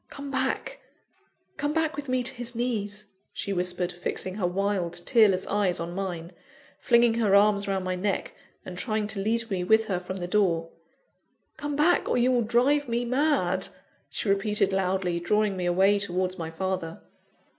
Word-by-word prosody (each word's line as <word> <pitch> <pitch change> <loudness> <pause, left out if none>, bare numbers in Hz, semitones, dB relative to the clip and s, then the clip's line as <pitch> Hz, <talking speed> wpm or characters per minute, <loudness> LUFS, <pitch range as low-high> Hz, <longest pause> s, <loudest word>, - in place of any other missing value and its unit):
"Come 280 0 -8
back 265 - -2 0.8
come 290 +1 -1
back 320 -1 0
with 285 -2 -6
me 255 0 +1
to 260 +2 +1
his 240 -1 -5
knees!" 210 -3 -2 0.3
she 200 - -3
whispered, 180 0 -1
fixing 180 +1 -4
her 190 -3 -1
wild, 185 -2 -1
tearless 210 -6 +4
eyes 200 -3 +1
on 170 +1 -4
mine, 180 -3 -4 0.5
flinging 235 -1 +4
her 205 -3 +3
arms 200 0 +4
round 190 -1 -1
my 185 - -1
neck, 190 +2 -2 0.3
and 180 -1 -7
trying 215 -2 -1
to 215 - -3
lead 225 +2 -1
me 185 -2 -1
with 220 +4 +4
her 190 -4 -1
from 185 +1 -6
the 175 - -4
door. 175 -4 +1 0.9
"Come 290 -1 -4
back, 300 +5 +3
or - - +2
you 245 +1 +3
will 245 -1 +3
drive 250 +5 +2
me 235 +1 0
mad!" 250 - +1 0.4
she - - -4
repeated 195 0 +2
loudly, 185 -2 0
drawing 210 +3 +1
me 180 -1 -2
away 195 +3 +3
towards 185 -1 -1
my 160 -1 -4
father. 170 -1 -4
200 Hz, 175 wpm, -27 LUFS, 185-235 Hz, 0.9 s, tearless